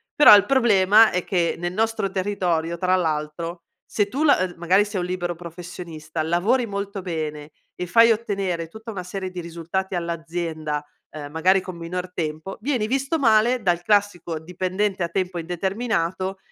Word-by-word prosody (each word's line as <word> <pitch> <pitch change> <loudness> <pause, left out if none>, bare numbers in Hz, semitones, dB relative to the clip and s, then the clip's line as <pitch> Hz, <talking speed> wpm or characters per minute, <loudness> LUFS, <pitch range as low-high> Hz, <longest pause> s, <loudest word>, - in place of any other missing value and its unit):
Però 295 -9 +10
il 200 - +5
problema, 220 -5 +5
è 180 -1 -1
che 175 -4 0
nel 175 +1 -3
nostro 220 -1 0
territorio, 180 -4 -1
tra 185 +1 +2
l'altro, 165 +1 -2 0.2
se 205 -2 0
tu 275 +8 -2
la 285 -9 +5
ehm, 185 -1 -2
magari 185 +4 +3
sei 205 -3 -3
un - - -2
libero 175 -1 -3
professionista, 165 -2 -7
lavori 200 +10 +1
molto 200 -1 -4
bene 155 -4 -5 0.2
e 180 - -4
fai 230 +4 +6
ottenere 195 -7 -1
tutta 220 +6 -9
una 185 -3 -5
serie 185 +1 -5
di 180 - -6
risultati 170 +3 -4
all'azienda, 165 -3 -3 0.3
uhm, 145 -2 -7
magari 185 +4 +3
con 185 -2 -8
minor 180 +2 -5
tempo, 155 +3 -4
vieni 245 -5 0
visto 275 +5 0
male 235 0 +4
dal 175 -3 +1
classico 200 -6 +1
dipendente 185 +3 -2
a - - 0
tempo 180 0 -2
indeterminato, 190 +1 -2
180 Hz, 165 wpm, -23 LUFS, 170-205 Hz, 0.3 s, Però